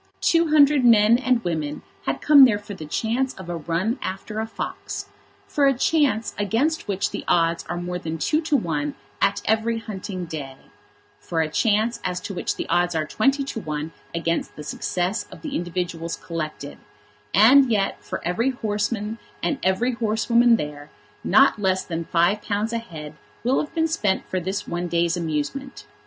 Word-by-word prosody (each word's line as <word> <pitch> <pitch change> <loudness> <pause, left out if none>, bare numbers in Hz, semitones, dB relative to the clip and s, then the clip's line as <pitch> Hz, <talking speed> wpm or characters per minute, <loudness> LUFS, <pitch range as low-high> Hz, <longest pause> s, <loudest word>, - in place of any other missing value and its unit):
Two 335 0 +3
hundred 295 -3 +5
men 225 -1 +6
and 255 -3 +1
women 155 -4 -3 0.2
had 135 0 -1
come 295 -2 +8
there 230 -6 +6
for 205 0 -9
the 155 -5 -8
chance 235 - -1
of 190 -2 -10
a 175 - -2
run 170 - -1
after 205 +3 -4
a 220 - -2
fox, - - -5 0.4
for 285 -1 +2
a 270 -2 +2
chance 265 -6 +2
against 230 - 0
which 200 0 -1
the - - -5
odds 165 0 +2
are 175 - -2
more 180 0 -3
than 165 -1 -4
two 305 - +1
to 310 -3 +2
one 150 - -2 0.3
at 200 0 +2
every 225 +1 +1
hunting 200 -4 -5
day, 145 -5 -7 0.6
for 165 -1 -1
a 160 - 0
chance 220 +5 +1
as 180 -1 -2
to 200 - -6
which 180 - -2
the - - -4
odds 175 -1 +1
are 155 -1 0
twenty 270 - +1
to 270 -4 -5
one 155 -3 -4 0.2
against 170 0 -2
the 150 - -8
success 180 +6 -2
of - - -12
the 295 -3 -4
individuals 175 -1 -3
collected; 155 -4 -6 0.5
and 250 +5 +6
yet, 200 -3 0
for - - -6
every 230 +9 +1
horseman 215 -2 -2 0.2
and 290 - 0
every 190 +7 +1
horsewoman 235 +1 +3
there, 150 -6 -5 0.3
not - - +5
less 190 -2 +1
than 165 -1 -4
£5 205 +5 +1
a 230 - 0
head 155 -8 -9 0.3
will 250 +3 +2
have 300 - -3
been 325 0 +2
spent 210 -13 0
for 185 - -1
this 190 +3 -3
one 175 +1 -2
day's 170 0 +1
amusement. 170 - -3
205 Hz, 175 wpm, -23 LUFS, 170-235 Hz, 0.6 s, come